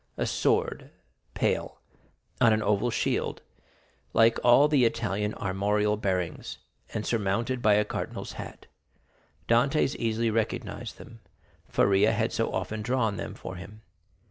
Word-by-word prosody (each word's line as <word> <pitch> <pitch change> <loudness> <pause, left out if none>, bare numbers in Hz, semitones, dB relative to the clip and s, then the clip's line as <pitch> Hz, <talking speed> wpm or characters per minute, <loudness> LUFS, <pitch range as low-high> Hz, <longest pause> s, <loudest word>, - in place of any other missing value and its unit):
a - - 0
sword, - - +1
en - - -16 0.5
pale, - - -1 0.6
on 115 -2 +6
an 110 0 +2
oval 105 +3 +1
shield, 110 - -1 0.7
like 115 0 +4
all 125 +4 +6
the 145 -4 +3
Italian 110 -3 0
armorial 105 +2 0
bearings, 95 -5 -3 0.3
and 110 - -3
surmounted 115 +3 -1
by 105 -2 +5
a 105 0 +2
cardinal's - - -5
hat. - - -9 0.8
Dantès 135 +4 +2
easily 115 0 0
recognized 110 0 -3
them, 115 0 -13 0.5
Faria 100 +3 +3
had 110 +1 0
so 115 - 0
often 100 +4 -3
drawn 110 -3 0
them - - -5
for 95 - -8
him. 105 +4 -11
110 Hz, 135 wpm, -27 LUFS, 105-115 Hz, 0.8 s, on